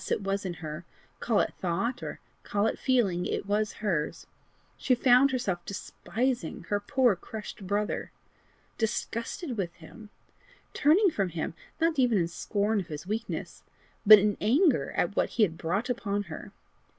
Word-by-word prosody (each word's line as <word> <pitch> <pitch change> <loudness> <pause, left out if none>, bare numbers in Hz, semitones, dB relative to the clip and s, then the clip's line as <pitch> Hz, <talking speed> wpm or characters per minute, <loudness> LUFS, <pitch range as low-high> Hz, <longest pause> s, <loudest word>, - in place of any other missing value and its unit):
it 205 - 0
was 195 0 -1
in 175 - -4
her 155 0 -7 0.4
call 225 -4 +2
it - - -2
thought, 195 +8 -1
or - - -6 0.2
call 205 +1 0
it - - -1
feeling, 200 -9 +1
it - - -2
was 210 +1 0
hers! 165 -7 -1 0.5
she 255 - +2
found 250 +2 +5
herself 200 -10 -2
despising 230 0 -3
her 205 - +1
poor 250 0 +2
crushed 205 +1 -8
brother! 205 +2 -1 0.7
disgusted 230 +5 -2
with 180 -4 -2
him! 210 +6 -13 0.6
turning 350 +7 +4
from 195 - -1
him, 165 -1 -3 0.3
not 325 -2 +2
even 245 -4 +4
in 170 -3 +2
scorn 205 +5 -1
of 185 - -5
his 155 -1 -7
weakness, 220 +4 -4 0.4
but 215 0 +11
in 205 0 +2
anger 285 - +3
at - - 0
what - - +2
he 225 - +5
had 170 -6 +1
brought 180 +9 -1
upon 205 -5 -1
her! 160 -4 -9
210 Hz, 160 wpm, -28 LUFS, 185-245 Hz, 0.7 s, but